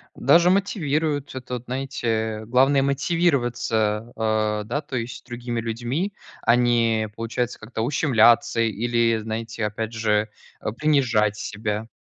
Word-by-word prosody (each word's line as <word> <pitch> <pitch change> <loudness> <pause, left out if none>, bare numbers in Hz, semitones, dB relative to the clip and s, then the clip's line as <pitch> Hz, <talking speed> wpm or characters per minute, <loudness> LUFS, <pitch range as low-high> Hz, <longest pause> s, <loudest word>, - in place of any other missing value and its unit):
Даже 170 +7 +5
мотивирует 155 - 0
это, 125 -1 -5
знаете, 130 +1 -4
э. 110 -1 -1
Главное 135 +4 +4
мотивироваться, 120 -7 0
э, 110 -1 0
да, 145 +7 -2
то 145 -3 -7
есть 115 +1 -6
другими 120 -1 -4
людьми. 120 - -2 0.3
А 115 - +4
не, 115 -3 +2
получается 120 +2 -3
как-то, 110 0 -5
ущемляться 120 -3 +3
или, 115 +1 +1
знаете, 110 0 -4
опять 110 +2 -4
же, 110 -1 +1 0.3
э, - - -2
принижать 115 -6 +2
себя. 105 +1 -4
120 Hz, 125 wpm, -23 LUFS, 110-135 Hz, 0.3 s, Даже